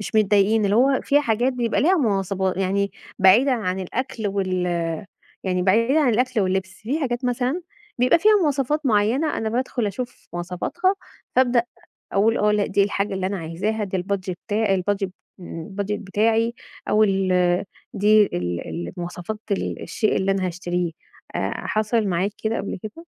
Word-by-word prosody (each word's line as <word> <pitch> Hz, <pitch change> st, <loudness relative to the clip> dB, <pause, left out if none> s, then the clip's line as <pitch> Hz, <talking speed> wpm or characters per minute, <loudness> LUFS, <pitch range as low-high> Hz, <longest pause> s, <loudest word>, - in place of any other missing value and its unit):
مش 210 Hz, -, -6 dB
متضايقين 210 Hz, 0 st, +4 dB
اللي 200 Hz, +1 st, +2 dB
هو 265 Hz, +2 st, +4 dB
في 290 Hz, +1 st, +3 dB
حاجات 245 Hz, 0 st, +1 dB
بيبقى 240 Hz, -2 st, 0 dB
ليها 360 Hz, +7 st, +4 dB
مواصفات، 195 Hz, -, 0 dB
يعني 195 Hz, +1 st, 0 dB, 0.3 s
بعيدًا 225 Hz, +9 st, +6 dB
عن 190 Hz, -6 st, -1 dB
الأكل 225 Hz, +3 st, -3 dB
وال 195 Hz, -2 st, -1 dB, 0.9 s
يعني 180 Hz, -1 st, 0 dB
بعيدًا 230 Hz, +10 st, +3 dB
عن 290 Hz, -, +3 dB
الأكل 250 Hz, 0 st, +1 dB
واللبس، 190 Hz, 0 st, 0 dB
في 270 Hz, +9 st, -1 dB
حاجات 250 Hz, -3 st, -2 dB
مثلًا 250 Hz, +7 st, 0 dB, 0.4 s
بيبقى 250 Hz, +6 st, +4 dB
فيها 430 Hz, +6 st, +5 dB
مواصفات 295 Hz, 0 st, 0 dB
معيّنة 235 Hz, +7 st, +2 dB
أنا 220 Hz, -, -1 dB
بادخل 245 Hz, 0 st, -1 dB
أشوف 240 Hz, +5 st, -6 dB
مواصفاتها 180 Hz, -, -1 dB, 0.4 s
فأبدأ 250 Hz, -2 st, +4 dB, 0.5 s
أقول: 220 Hz, +4 st, +3 dB
"آه، 210 Hz, 0 st, +3 dB
لأ 210 Hz, -1 st, +1 dB
دي 200 Hz, +1 st, +2 dB
الحاجة 200 Hz, 0 st, -1 dB
اللي 190 Hz, -1 st, -1 dB
أنا 195 Hz, +1 st, -2 dB
عايزاها 195 Hz, +7 st, -2 dB
دي 190 Hz, -1 st, -3 dB
الbudget 190 Hz, 0 st, -2 dB
بتاع 210 Hz, -2 st, +1 dB
الbudget 195 Hz, +1 st, -1 dB, 0.7 s
budget 200 Hz, +1 st, -3 dB
بتاعي 225 Hz, +3 st, +1 dB, 0.3 s
أو 215 Hz, -, +4 dB
ال 195 Hz, -2 st, +1 dB, 0.7 s
دي 210 Hz, +2 st, +5 dB
ال 90 Hz, -, -3 dB
ال 170 Hz, -, -5 dB
المواصفات 180 Hz, +4 st, -5 dB
ال 200 Hz, -, -2 dB
الشيء 215 Hz, -3 st, 0 dB
اللي 195 Hz, +1 st, +1 dB
أنا 190 Hz, -1 st, 0 dB
هاشتريه، 175 Hz, 0 st, -2 dB, 0.4 s
آآ، -, -, -1 dB, 0.2 s
حصل 215 Hz, +1 st, +1 dB
معاك 185 Hz, +2 st, 0 dB
كده 225 Hz, +1 st, 0 dB
قبل 195 Hz, -, -4 dB
كده؟ 220 Hz, +11 st, -8 dB
210 Hz, 160 wpm, -23 LUFS, 190-245 Hz, 0.9 s, بعيدًا